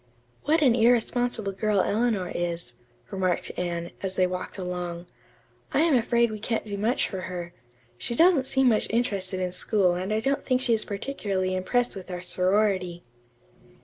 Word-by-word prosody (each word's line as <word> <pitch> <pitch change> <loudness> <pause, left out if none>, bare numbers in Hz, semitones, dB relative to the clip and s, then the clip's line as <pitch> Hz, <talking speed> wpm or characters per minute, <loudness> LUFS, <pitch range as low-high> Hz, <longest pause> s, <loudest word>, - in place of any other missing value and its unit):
"What 310 +2 +3
an 255 -4 +5
irresponsible 235 -2 +2
girl 210 +1 0
Eleanor 210 -4 0
is," 170 -7 -3 0.4
remarked 185 -3 -1
Anne, 170 -1 -3
as 190 -1 -3
they 185 - +3
walked 180 +2 -5
along. 180 -2 -4 0.7
"I 285 - +4
am 325 -2 +3
afraid 235 -1 +2
we 215 - -6
can't 225 +1 -2
do 205 -1 -4
much 220 +5 +1
for 190 -2 -5
her. 175 -1 -6 0.5
She 235 - -2
doesn't 325 -3 +4
seem 265 -1 +4
much 220 - +1
interested 200 -5 -1
in 180 -1 -1
school 185 0 +2
and 185 +3 -3
I 215 - +1
don't 275 +5 -1
think 255 -1 +1
she 250 -2 +2
is 220 - +3
particularly 200 -4 -2
impressed 240 +7 0
with 190 -1 -9
our 180 -1 -5
sorority." 185 -1 +1
200 Hz, 170 wpm, -26 LUFS, 180-235 Hz, 0.7 s, an